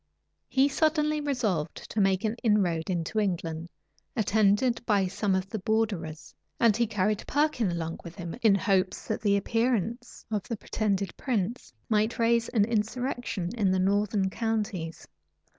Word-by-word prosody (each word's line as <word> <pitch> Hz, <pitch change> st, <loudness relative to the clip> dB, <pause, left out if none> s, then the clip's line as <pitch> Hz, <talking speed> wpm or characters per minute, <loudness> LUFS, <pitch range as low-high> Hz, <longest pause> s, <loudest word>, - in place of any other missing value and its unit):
He 270 Hz, +1 st, +4 dB
suddenly 305 Hz, +1 st, +1 dB
resolved 225 Hz, -, -1 dB, 0.2 s
to 210 Hz, -, +1 dB
make 195 Hz, 0 st, +2 dB
an 220 Hz, 0 st, 0 dB
inroad 190 Hz, -7 st, +2 dB
into 175 Hz, +4 st, -1 dB
England, 170 Hz, -4 st, -2 dB, 0.5 s
attended 220 Hz, +3 st, +2 dB
by 205 Hz, -4 st, +2 dB
some 195 Hz, +1 st, 0 dB
of 190 Hz, 0 st, -1 dB
the 220 Hz, -, -2 dB
borderers; 190 Hz, -7 st, -2 dB, 0.3 s
and 230 Hz, -3 st, +5 dB
he 235 Hz, +1 st, +1 dB
carried 210 Hz, 0 st, 0 dB
Perkin 290 Hz, -8 st, +1 dB
along 165 Hz, -1 st, -3 dB
with 170 Hz, -1 st, -9 dB
him, 170 Hz, -2 st, -6 dB
in 215 Hz, -3 st, +5 dB
hopes 190 Hz, -2 st, +1 dB
that -, -, -2 dB
the 200 Hz, -2 st, +3 dB
appearance 235 Hz, +2 st, -1 dB
of 210 Hz, -2 st, 0 dB
the 230 Hz, -, -3 dB
pretended 200 Hz, -2 st, -1 dB
prince 235 Hz, -2 st, -2 dB, 0.2 s
might 215 Hz, +1 st, +1 dB
raise 230 Hz, 0 st, +2 dB
an 215 Hz, -4 st, +3 dB
insurrection 230 Hz, -3 st, -2 dB
in 205 Hz, -5 st, +2 dB
the 185 Hz, -, +2 dB
northern 195 Hz, +1 st, +1 dB
counties. 210 Hz, -8 st, -3 dB
210 Hz, 150 wpm, -28 LUFS, 190-230 Hz, 0.5 s, and